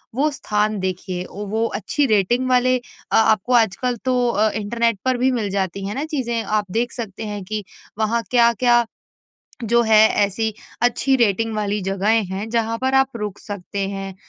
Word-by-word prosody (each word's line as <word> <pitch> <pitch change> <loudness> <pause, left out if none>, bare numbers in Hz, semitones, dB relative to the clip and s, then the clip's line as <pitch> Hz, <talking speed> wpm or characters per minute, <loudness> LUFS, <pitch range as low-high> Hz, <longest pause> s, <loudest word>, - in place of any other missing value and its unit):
वो 290 +4 +2
स्थान 215 -5 -1
देखिए 185 -1 -3
वो 210 +3 -2
अच्छी 290 +8 0
रेटिंग 235 +4 +2
वाले 255 0 +3
अ, 245 - -7
आपको 220 +1 +3
आजकल 235 +2 +2
तो 250 -1 +2
अ 215 -1 +2
इंटरनेट 230 0 0
पर 255 -1 +2
भी 255 +2 +2
मिल 225 -5 -1
जाती 195 0 -2
है 205 - -4
ना 280 +3 -2
चीज़ें 250 -7 -2
आप 210 -1 0
देख 235 +3 0
सकते 220 -3 -6
हैं 205 -2 -5
कि 215 +2 -4 0.4
वहाँ 225 +2 +1
क्या-क्या 240 0 +4 0.8
जो 235 +2 +3
है 220 -2 +5 0.3
ऐसी 220 +2 -2 0.3
अच्छी 245 +3 +2
रेटिंग 225 -1 +1
वाली 210 0 -1
जगहें 200 +3 +1
हैं 195 +4 -4
जहाँ 230 -1 0
पर 260 +2 0
आप 265 -2 +2
रुक 210 -3 -5
सकते 200 -1 -5
हैं, 195 -1 -5
220 Hz, 170 wpm, -21 LUFS, 205-245 Hz, 0.8 s, है